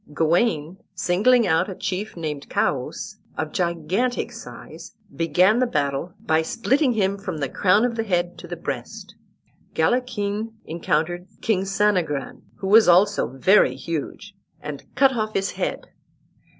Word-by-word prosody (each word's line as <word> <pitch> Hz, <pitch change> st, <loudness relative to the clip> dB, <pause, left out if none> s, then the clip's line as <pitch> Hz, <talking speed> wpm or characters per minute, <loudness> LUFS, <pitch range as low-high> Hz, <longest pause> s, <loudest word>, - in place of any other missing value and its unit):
Gawain, 165 Hz, 0 st, +1 dB, 0.2 s
singling 225 Hz, +7 st, +3 dB
out 165 Hz, +2 st, +2 dB
a 190 Hz, -, -6 dB
chief 190 Hz, +2 st, -4 dB
named 150 Hz, -4 st, -5 dB
Choas, -, -, -2 dB, 0.2 s
of 155 Hz, -1 st, -3 dB
gigantic 180 Hz, +8 st, -1 dB
size, -, -, -11 dB, 0.2 s
began 180 Hz, -, +3 dB
the 255 Hz, -, +2 dB
battle 150 Hz, 0 st, -2 dB
by 160 Hz, -7 st, +1 dB
splitting 250 Hz, -, +1 dB
him 200 Hz, -2 st, 0 dB
from 195 Hz, -5 st, -5 dB
the 140 Hz, -2 st, -1 dB
crown 195 Hz, -, +3 dB
of 245 Hz, -, -1 dB
the 225 Hz, -, -1 dB
head 175 Hz, -4 st, -1 dB
to -, -, -10 dB
the -, -, -5 dB
breast. -, -, -6 dB, 0.6 s
Galachin 225 Hz, -3 st, 0 dB
encountered 170 Hz, +2 st, -1 dB, 0.2 s
King 195 Hz, -4 st, +1 dB
Sanagran, 190 Hz, -8 st, 0 dB
who 190 Hz, -, -5 dB
was 215 Hz, +3 st, +6 dB
also 190 Hz, +4 st, +4 dB
very 190 Hz, +10 st, +4 dB
huge, 165 Hz, +5 st, -5 dB, 0.3 s
and 150 Hz, -2 st, -7 dB
cut 270 Hz, -1 st, +4 dB
off 215 Hz, -1 st, -2 dB
his 195 Hz, 0 st, 0 dB
head. -, -, -4 dB
190 Hz, 140 wpm, -23 LUFS, 165-215 Hz, 0.6 s, was